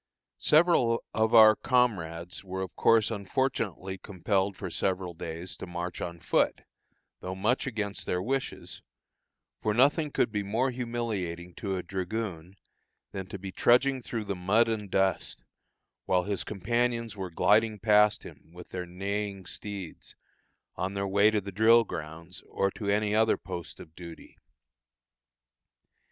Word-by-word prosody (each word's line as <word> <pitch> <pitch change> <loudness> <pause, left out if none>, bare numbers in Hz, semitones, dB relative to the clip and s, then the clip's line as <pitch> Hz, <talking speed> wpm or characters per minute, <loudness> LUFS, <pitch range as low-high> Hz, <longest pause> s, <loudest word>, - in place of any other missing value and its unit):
Several 150 -8 +4
of 110 +1 +2
our 110 -1 +9
comrades 90 -11 0
were 95 0 -4
of 95 - -8
course 115 0 +4
unfortunately 100 -3 -2
compelled 95 0 -1
for - - -5
several 95 -2 -1
days 85 +2 -7
to - - -7
march 85 0 -5
on 85 -1 -5
foot, - - +1 0.6
though 95 +1 -5
much 110 +8 0
against 105 -4 -4
their 90 - 0
wishes; 130 +7 -3 0.8
for 105 -2 0
nothing 145 +5 +3
could 120 - +1
be 105 -1 -1
more 115 +7 0
humiliating 110 -8 -4
to 95 0 -3
a 90 - -4
dragoon 95 -1 -4 0.6
than 95 -1 -6
to 100 - -6
be 95 0 -7
trudging 130 +5 +3
through 115 -2 -4
the 100 - -2
mud 100 +6 +3
and 105 -3 -3
dust, 95 -10 0 0.6
while 90 -1 +3
his 100 0 -2
companions 115 +2 -1
were 95 -2 -5
gliding 105 +5 +3
past 105 0 +4
him - - -13
with 90 0 -12
their 90 -1 -5
neighing 100 +1 -4
steeds, 100 0 -8 0.6
on 95 +2 -3
their 100 0 -1
way 100 +2 +4
to 110 -1 +1
the 100 +1 -7
drill 115 +4 +5
grounds, 80 -1 -8
or 100 0 0
to 100 0 -4
any 105 +1 +1
other 110 +1 +3
post 90 -2 -7
of 80 - -12
duty. 85 -2 -11
100 Hz, 145 wpm, -29 LUFS, 90-115 Hz, 0.8 s, our